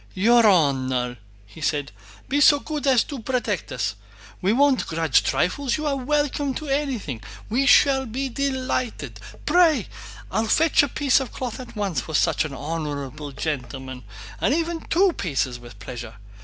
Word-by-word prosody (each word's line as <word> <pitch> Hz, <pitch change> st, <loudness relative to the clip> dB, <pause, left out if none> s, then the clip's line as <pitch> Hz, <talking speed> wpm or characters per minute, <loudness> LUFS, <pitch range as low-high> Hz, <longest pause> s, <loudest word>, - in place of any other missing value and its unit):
"Your 230 Hz, +4 st, +5 dB
honor!" 130 Hz, -, +2 dB, 0.4 s
said 145 Hz, -2 st, -1 dB
he. -, -, -21 dB
"Be 285 Hz, +3 st, +1 dB
so 290 Hz, 0 st, +7 dB
good 300 Hz, -1 st, -4 dB
as 255 Hz, -4 st, +5 dB
to 280 Hz, -3 st, -7 dB
protect 250 Hz, +2 st, -2 dB
us! -, -, -1 dB, 0.5 s
We 190 Hz, +2 st, +2 dB
won't 275 Hz, +2 st, +3 dB
grudge 160 Hz, -3 st, +2 dB
trifles, 260 Hz, +9 st, 0 dB
you 310 Hz, -, -4 dB
are 290 Hz, -2 st, +1 dB
welcome 285 Hz, 0 st, 0 dB
to 310 Hz, -, -5 dB
anything—we 250 Hz, -, -2 dB
shall 265 Hz, -2 st, +5 dB
be 260 Hz, +5 st, -3 dB
delighted! 255 Hz, -, -2 dB, 0.3 s
Pray!... 315 Hz, -, +4 dB, 0.4 s
I'll 220 Hz, 0 st, 0 dB
fetch 320 Hz, +7 st, +4 dB
a 285 Hz, -, +1 dB
piece 275 Hz, 0 st, +2 dB
of 265 Hz, -, -5 dB
cloth 250 Hz, -1 st, -5 dB
at 255 Hz, -, -10 dB
once 195 Hz, -10 st, -1 dB
for 160 Hz, -, -6 dB
such 155 Hz, -, +2 dB
an 150 Hz, -, -6 dB
honorable 145 Hz, -1 st, -5 dB
gentleman, 130 Hz, -3 st, -5 dB, 0.4 s
or -, -, +2 dB
even 330 Hz, +2 st, 0 dB
two 370 Hz, +2 st, +2 dB
pieces 135 Hz, -, -2 dB
with 120 Hz, -3 st, -13 dB
pleasure. 115 Hz, +2 st, -8 dB
230 Hz, 155 wpm, -23 LUFS, -, 0.5 s, so